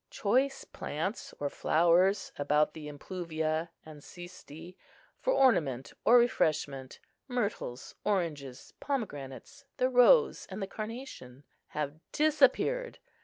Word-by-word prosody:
Choice 260 +6 +1
plants 165 +9 -4
or 145 - -1
flowers 175 +7 +2
about 150 +1 +2
the 155 -2 -8
impluvia 160 +1 -3 0.2
and 155 -2 -11
xysti, 175 0 -11 0.4
for - - 0
ornament 155 - +2
or 245 - +7
refreshment, 155 - 0 0.3
myrtles, 210 - -3
oranges, 150 -10 -2
pomegranates, 215 - -5
the 255 -1 +2
rose 345 - +5
and 190 +1 -6
the 195 - -2
carnation, 215 - -8 0.2
have 150 0 -4
disappeared. 470 +11 +2
175 Hz, 105 wpm, -30 LUFS, 145-240 Hz, 0.4 s, or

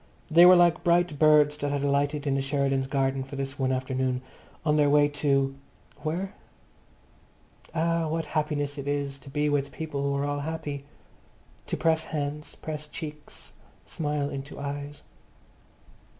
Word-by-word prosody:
They 170 +3 +9
were 185 - +9
like 175 -1 +4
bright 170 -3 +2
birds 150 -1 +5
that 145 -1 -2
had 145 -1 -1
alighted 145 +1 +1
in 140 - +1
the 135 - +1
Sheridans' 135 -1 0
garden 135 -1 0
for 135 +2 -9
this 135 +1 -4
one 130 -1 +1
afternoon, 130 0 -1 0.4
on 150 -1 +3
their 145 -1 +4
way 145 0 +5
to—where? 145 +5 -2 1.4
Ah, 165 0 +1
what 160 +1 -1
happiness 145 -2 -2
it 140 - -6
is 140 -1 -2
to 135 - -13
be 150 +2 0
with 145 -1 0
people 155 -3 -4
who 140 0 0
all 145 0 -1
are - - -4
happy, 145 -2 -4 0.8
to - - -2
press 160 -1 +2
hands, 150 0 -4
press 150 -1 -6
cheeks, 150 -1 -8 0.3
smile 150 -2 -2
into 140 +1 -7
eyes. 145 +1 -5
145 Hz, 150 wpm, -27 LUFS, 140-155 Hz, 1.4 s, They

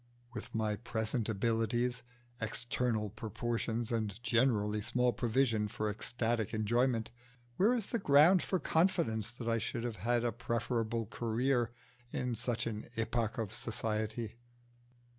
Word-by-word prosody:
With - - -7
my 110 -2 0
present 110 0 -2
abilities, 115 +3 +1 0.4
external 110 -1 -1
proportions, 115 +1 -2
and 110 -4 -1
generally 110 -4 +2
small 125 +3 +2
provision 115 -2 +2
for 105 +1 -2
ecstatic 115 0 -1
enjoyment, 115 +2 +1 0.5
where 220 +7 +5
is 230 -5 -1
the 235 - -1
ground 165 +2 +6
for 190 - 0
confidence 160 - +1
that 120 -1 -7
I 115 0 +2
should 115 +2 -3
have 120 -3 -3
had 120 +1 +1
a 120 - +1
preferable 115 0 -1
career 120 +3 0 0.4
in 125 -1 -1
such 120 +1 -1
an 110 -2 -4
epoch 115 +1 0
of 110 -4 -2
society? 110 0 -3
115 Hz, 130 wpm, -34 LUFS, 110-125 Hz, 0.5 s, ground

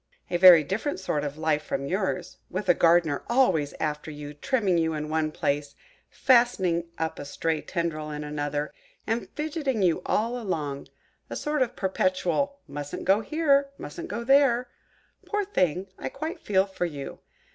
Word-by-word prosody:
A 175 - +2
very 175 -3 +9
different 195 - -2
sort 150 -6 -1
of 145 0 -4
life 155 -1 +1
from 140 -2 -3
yours, 185 +1 -2
with 190 +2 -4
a 175 - +7
Gardener 165 -4 +3
always 235 - +2
after 150 0 -2
you, 145 -1 -7
trimming 195 - +1
you 160 -1 0
in 150 0 -4
one 155 0 0
place, 145 -1 -2 0.3
fastening 195 -9 +3
up 160 0 -3
a - - -5
stray 155 +2 -2
tendril 165 -4 -3
in 150 0 -5
another, 145 0 -3 0.3
and 225 +2 -2
fidgeting 295 - -1
you 180 0 +2
all 235 +3 0
along–a 155 -10 -6
sort 300 -1 -1
of 250 -1 0
perpetual 190 +8 0
'mustn't 145 0 -6
go 195 +2 +4
here'–'mustn't 280 - 0
go 235 +4 -4
there.' 255 -2 +4 0.6
Poor 415 -1 0
thing! 185 - 0
I - - -3
quite 315 +7 -5
feel 190 -2 +2
for 190 -2 -3
you! 145 -4 -7
180 Hz, 155 wpm, -26 LUFS, 150-240 Hz, 0.6 s, very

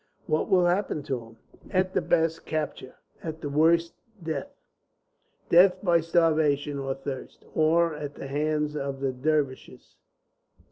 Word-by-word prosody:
"What 155 -3 0
will 180 -2 +4
happen 175 -4 0
to 135 -3 -2
him?" 115 0 -16 0.3
"At 185 0 0
the - - +2
best, 165 0 +1
capture; 150 -4 -4 0.3
at 160 -1 -6
the 145 - -4
worst, 165 +3 +3 0.3
death. 155 -4 -3 1.0
Death 180 +2 +6
by 170 -3 +4
starvation, 155 -4 +2
or 135 -1 -2
thirst, 135 -1 -7
or 165 +1 +3
at 145 -1 -6
the - - -8
hands 150 +2 -1
of 140 -2 -3
the 135 -1 0
Dervishes. 140 0 -2
155 Hz, 140 wpm, -27 LUFS, 140-165 Hz, 1.0 s, Death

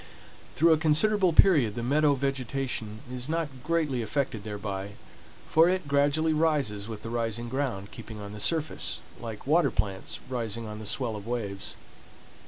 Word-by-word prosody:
Through 165 +1 +6
a 155 - +2
considerable 185 +5 +4
period 150 - +5
the 120 - -3
meadow 145 +3 +3
vegetation 130 -5 -3
is 125 +2 -3
not 165 -1 0
greatly 150 -6 0
affected 115 -1 -2
thereby, 100 -1 -5 0.5
for 165 +2 +5
it 185 -4 -1
gradually 145 +3 +2
rises 145 -11 +1
with 110 -2 -7
the 115 - -5
rising 115 0 -2
ground, 125 -7 -2
keeping 110 -2 -9
on 100 0 -7
the 105 - -7
surface 160 +6 0 0.2
like 115 -2 -7
water 155 +1 +4
plants 100 -4 -2
rising 115 -3 -3
on 105 0 -6
the 110 - -6
swell 120 0 0
of 105 +1 -8
waves. 105 -5 -3
125 Hz, 160 wpm, -28 LUFS, 110-155 Hz, 0.5 s, Through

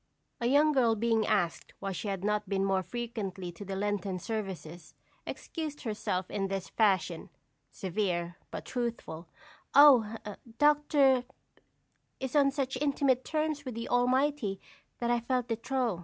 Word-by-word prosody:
A 235 - 0
young 290 +4 +5
girl 240 -5 +3
being 225 0 +1
asked 195 -6 0
why 195 - -4
she 195 - -4
had 195 -2 -3
not 210 -1 0
been 195 -1 +1
more 190 -1 +2
frequently 200 -5 -5
to 175 +4 -10
Lenten 200 -1 -1
services, 180 -6 -6 0.3
excused 310 -3 -5
herself 190 -5 -2
in 195 -1 -1
this 195 -1 -4
fashion, 185 -6 +1 0.4
severe, 175 -3 -2
but - - -6
truthful: 230 -9 -4 0.5
"Oh, 255 -7 +7 0.4
Dr. 295 -3 +4 1.0
is 265 +1 -4
on 280 -1 +5
such 270 -2 -2
intimate 275 -3 +2
terms 310 -1 -1
with 255 -4 -6
the 230 0 -5
Almighty 250 -4 +1 0.4
that 240 0 0
I 240 - +3
felt 250 +1 -1
de 225 - +1
trop." 240 -4 -1
230 Hz, 140 wpm, -30 LUFS, 195-265 Hz, 1.0 s, Oh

